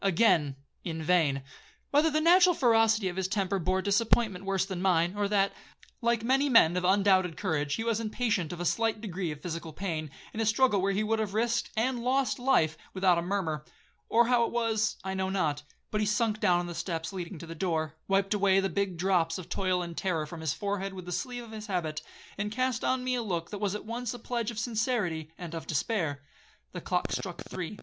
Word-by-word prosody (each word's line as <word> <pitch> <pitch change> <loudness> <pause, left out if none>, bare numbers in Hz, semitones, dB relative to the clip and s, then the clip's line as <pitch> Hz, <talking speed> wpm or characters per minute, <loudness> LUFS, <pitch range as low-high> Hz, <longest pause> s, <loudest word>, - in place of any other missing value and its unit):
—Again—in 160 -4 +1
vain.—Whether 160 - 0
the 310 0 +1
natural 360 +2 +6
ferocity 225 -5 +3
of 180 0 -4
his 190 -1 0
temper 195 0 0
bore 185 +2 0
disappointment 205 -1 +2
worse 195 -1 +1
than 190 -2 -5
mine, 175 -2 +2
or 205 -1 0
that, 200 -1 +2 0.5
like 235 -1 +1
many 270 +4 +2
men 180 -9 +6
of 180 - 0
undoubted 190 -3 +3
courage, 150 -6 -1
he 225 - -3
was 230 -1 0
impatient 215 -6 -1
of 175 - -6
a 175 - -3
slight 225 +4 +1
degree 190 -5 -3
of 150 -1 -7
physical 165 -2 -5
pain, 155 -2 -4 0.2
in 220 - -5
a 225 - +1
struggle 225 -3 +3
where 195 +1 +1
he 200 +2 0
would 220 +1 0
have 210 -2 -2
risked 235 +1 +1
and 245 +2 +1
lost 260 +2 +1
life 245 - +2 0.2
without 185 -2 +3
a - - -1
murmur,—or 180 +5 -1
how 240 0 +3
it - - -1
was, 225 -3 0
I 190 0 -3
know 190 0 -1
not,—but 160 +3 -2
he 210 - +1
sunk 215 0 +1
down 180 -4 +4
on 175 - -2
the 175 - -5
steps 165 0 -4
leading 180 -1 -5
to 165 - -8
the 165 - -7
door, 160 -3 -2
wiped 195 +1 +2
away 195 -2 +3
the 195 0 0
big 190 0 -1
drops 170 -2 +1
of 185 - -9
toil 185 -2 0
and 170 -1 -7
terror 165 -5 -1
from 160 +2 -8
his 160 -3 0
forehead 200 -1 -3
with 185 -2 -8
the 180 - -6
sleeve 245 +6 -3
of 230 - -12
his 215 0 -7
habit, 165 -6 -2 0.4
and 210 0 -2
cast 255 +1 -1
on 255 0 +1
me 255 0 0
a 245 - 0
look 175 -6 -3
that 205 - -5
was 205 -1 0
at 210 - -6
once 235 +1 -3
the - - -6
pledge 235 -3 -3
of 235 - -7
sincerity 215 -9 -1
and 170 -2 -7
of 165 - -6
despair. 155 - -1 0.5
The - - -6
clock - - -1
struck - - -4
three. - - -5
195 Hz, 215 wpm, -29 LUFS, 170-225 Hz, 0.5 s, natural